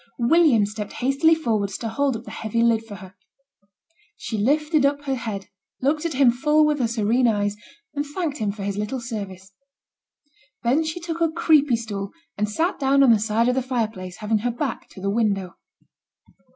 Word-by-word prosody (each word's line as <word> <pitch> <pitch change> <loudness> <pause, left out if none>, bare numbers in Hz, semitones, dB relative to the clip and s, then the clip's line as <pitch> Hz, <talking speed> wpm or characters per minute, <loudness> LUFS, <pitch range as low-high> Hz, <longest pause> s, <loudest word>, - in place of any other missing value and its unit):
William 250 -3 +4
stepped 210 0 -6
hastily 275 +6 +3
forwards 215 -10 -1
to 230 - -4
hold 265 +2 0
up 225 - -11
the - - -10
heavy 230 +1 -1
lid 230 -1 +3
for 220 -2 -9
her. 190 -1 -12 1.0
She 225 - -5
lifted 300 +7 +2
up 285 +1 +1
her 275 -2 -1
head, 220 -6 -4 0.3
looked 300 +5 0
at 320 - -5
him 265 -3 +5
full 300 +5 +3
with 300 -1 +1
her 245 - +2
serene 235 +2 +2
eyes, 205 -2 0 0.4
and 290 0 -1
thanked 295 0 -4
him 210 -2 0
for 200 -1 -7
his 200 0 -3
little 210 +5 -3
service. 200 -5 -7 1.1
Then 260 +7 +2
she 315 +2 -4
took 335 -1 -5
a 330 - +3
creepie 310 -5 +3
stool 205 -4 -5 0.2
and 210 0 -1
sate 330 - -1
down 275 0 +4
on 255 - +6
the 220 - +5
side 220 +2 +1
of 250 - +3
the 265 - 0
fire 245 -4 -1
place, 185 -4 -9
having 215 0 0
her 245 +4 -1
back 245 +2 -4
to 190 - -12
the 200 +1 -1
window. 200 -5 0
235 Hz, 195 wpm, -23 LUFS, 210-285 Hz, 1.1 s, on